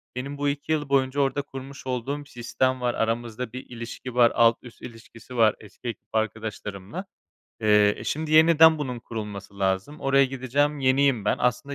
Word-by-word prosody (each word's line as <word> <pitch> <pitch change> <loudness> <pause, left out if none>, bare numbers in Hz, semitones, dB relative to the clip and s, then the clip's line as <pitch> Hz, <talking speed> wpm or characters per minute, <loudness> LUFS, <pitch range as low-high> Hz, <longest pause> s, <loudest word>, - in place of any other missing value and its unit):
benim 140 +3 -5
bu 145 0 0
2 145 +2 -4
yıl 150 -3 0
boyunca 135 0 +1
orada 140 +1 +1
kurmuş 135 -1 -10
olduğum 135 +4 -3
sistem 130 0 -1
var. 120 -1 0
Aramızda 115 +1 -2
bir 130 - -7
ilişki 120 +1 -8
var, 120 -2 +5
alt 115 0 +5
üst 125 -2 -14
ilişkisi 120 +1 -11
var 110 -2 +4
eski 110 +3 -12
ekip 115 - -6
arkadaşlarımla. 110 - -4 0.6
Eee, 105 -1 +4
eee, - - -9
şimdi 155 +1 -2
yeniden 160 0 +7
bunun 125 -4 -4
kurulması 105 -4 -7
lazım. 95 +9 -1
Oraya 135 0 +4
gideceğim 135 +3 -1
yeniyim 130 -4 +2
ben. - - +2
Aslında 140 +3 -1
125 Hz, 170 wpm, -25 LUFS, 115-140 Hz, 0.6 s, yeniden